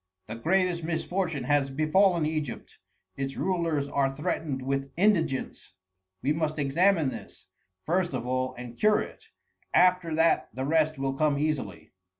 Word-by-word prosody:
The 110 - -7
greatest 175 +7 +1
misfortune 165 -2 -2
has 140 +1 +2
befallen 160 +4 +3
Egypt: 155 -5 -4 0.4
its 135 0 -4
rulers 165 -6 0
are 140 -1 +1
threatened 145 -2 -2
with 135 +1 -2
indigence. 175 -8 0 0.5
We 145 - +2
must 155 -1 -2
examine 155 +2 +2
this, - - -10 0.4
first 175 -3 0
of 120 -2 -4
all, 130 +1 -1
and 125 -1 -9
cure 210 - +3
it; - - -9 0.5
after 180 -3 +4
that 165 +1 +2
the 130 +1 -2
rest 155 +1 +2
will 135 0 -1
come 145 0 +1
easily." 145 - -3
155 Hz, 145 wpm, -27 LUFS, 135-170 Hz, 0.5 s, after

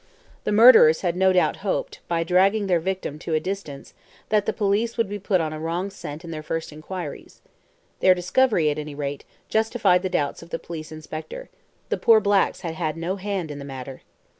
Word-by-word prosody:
The - - 0
murderers 210 -8 +7
had 175 -2 0
no 190 +1 +4
doubt 180 -4 +2
hoped, 195 -1 -3
by 165 -1 0
dragging 195 +4 +3
their 180 -3 +2
victim 185 -4 -4
to 160 0 -2
a - - +3
distance, 170 -5 -6 0.4
that 210 -1 +2
the - - +3
police 215 +3 0
would 230 -3 +1
be 205 +1 -5
put 190 -1 +1
on 155 -1 -3
a 155 - -6
wrong 170 +5 -3
scent 155 -4 -8
in 165 - -7
their 155 -1 -5
first 160 0 -4
inquiries. 155 0 -8 0.6
This 185 -1 +5
discovery, 180 -3 +2
at 145 - -4
any 150 -1 -6
rate, 140 -1 -4 0.2
justified 220 -5 +2
the 185 - -2
doubts 145 -5 -1
of 170 - -13
the - - -3
police 160 -2 -8
inspector. 155 - -8 0.4
The - - 0
poor 225 -1 +5
blacks 200 -1 +1
had 170 -3 -4
had 160 -1 -3
no 175 +4 -3
hand 190 -5 -3
in 145 - -7
the - - -7
matter. 135 -1 -8
180 Hz, 205 wpm, -24 LUFS, 155-200 Hz, 0.6 s, murderers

